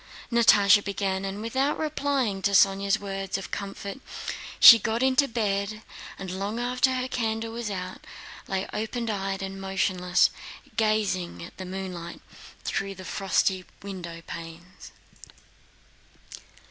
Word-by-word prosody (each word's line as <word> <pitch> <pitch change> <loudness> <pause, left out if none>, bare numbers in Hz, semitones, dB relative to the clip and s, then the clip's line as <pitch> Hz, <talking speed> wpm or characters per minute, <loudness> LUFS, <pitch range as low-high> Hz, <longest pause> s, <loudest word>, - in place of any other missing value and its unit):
Natásha 210 -3 +6
began, 195 -1 -2
and 195 +2 -5
without 265 +5 0
replying 280 -9 -1
to 200 +1 +1
Sónya's 195 0 +4
words 195 -1 -3
of 195 - -8
comfort 200 +3 -5 0.6
she 230 - +11
got 225 +3 -1
into 265 +2 +4
bed, 215 -2 -2 0.3
and 190 -2 -6
long 200 +5 -3
after 250 +2 +1
her 255 0 -1
candle 225 -3 -2
was 235 -2 -4
out 185 -2 -6 0.4
lay 190 0 -2
open 225 +2 -3
eyed 195 -1 -3
and 195 0 -6
motionless, 185 -2 +2 0.4
gazing 215 -6 0
at 170 - -11
the 185 - -6
moonlight 180 -2 -6 0.4
through 195 0 -2
the 185 0 -10
frosty 190 0 0 0.2
windowpanes. 170 -2 -9
200 Hz, 120 wpm, -26 LUFS, 190-225 Hz, 0.6 s, she